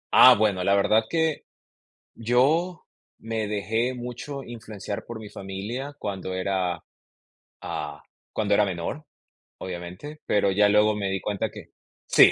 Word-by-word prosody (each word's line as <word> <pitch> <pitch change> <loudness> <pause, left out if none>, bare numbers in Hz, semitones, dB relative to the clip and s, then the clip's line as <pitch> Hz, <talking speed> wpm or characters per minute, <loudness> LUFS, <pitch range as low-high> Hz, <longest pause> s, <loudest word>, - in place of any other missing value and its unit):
Ah, 130 -1 +10
bueno, 105 -4 +2
la 100 - +4
verdad 110 +2 +3
que 160 -2 0 0.7
yo, 145 +10 +2 0.3
me 110 -1 -2
dejé 110 +4 0
mucho 125 +3 -6
influenciar 110 -4 -6
por 120 -1 -6
mi 105 -2 -9
familia 105 +9 -5
cuando 95 -4 -4
era, 95 -2 -1 0.8
ah, 75 -1 -5 0.3
cuando 105 -2 +1
era 105 - +4
menor, 95 - -4 0.5
obviamente. 90 - -7
Pero 100 -1 +3
ya 105 +2 +4
luego 105 +1 +4
me 100 -2 -1
di 95 0 -1
cuenta 105 -2 -1
que - - -10 0.4
Sí. - - +8
105 Hz, 135 wpm, -26 LUFS, 95-120 Hz, 0.8 s, Ah